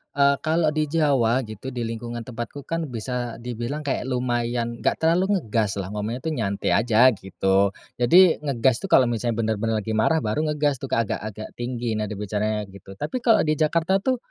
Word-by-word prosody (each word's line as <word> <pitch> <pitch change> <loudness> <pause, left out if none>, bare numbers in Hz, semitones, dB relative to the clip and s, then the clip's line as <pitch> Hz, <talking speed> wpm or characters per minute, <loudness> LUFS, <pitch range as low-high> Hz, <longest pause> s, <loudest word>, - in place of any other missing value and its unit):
eee, 140 0 +4
kalau 160 -1 +1
di 155 0 0
Jawa 135 -6 +2
gitu, 110 +4 -7
di 120 -1 -3
lingkungan 115 +1 -5
tempatku 120 +4 -7
kan 165 -2 -3
bisa 120 0 -4
dibilang 120 +5 -4
kayak 135 -2 -2
lumayan, 120 -2 -1
enggak - - +1
terlalu 185 +5 +3
ngegas 105 -2 -1
lah. 95 0 -4
Ngomongnya 110 +4 -4
tuh 160 -1 -1
nyantai 100 -6 -1
aja 120 +3 +5
gitu. 95 0 +1 0.3
Jadi 175 +8 +6
ngegas 130 -4 +1
tuh 195 - -4
kalau 130 - +6
misalnya 115 0 -1
bener-bener 110 0 0
lagi 110 - -4
marah, 110 +10 +2
baru 150 +9 -1
ngegas 145 -3 0
tuh 135 - -5
agak-agak 110 -1 -3
tinggi, 120 -1 -3
nada 105 0 -3
bicara 105 +1 -2
gitu. 95 0 -13
Tapi 150 - -3
kalau 225 -4 +4
di 155 - +2
Jakarta 170 +5 +2
tuh, 255 +1 +1
120 Hz, 180 wpm, -24 LUFS, 110-150 Hz, 0.3 s, Jadi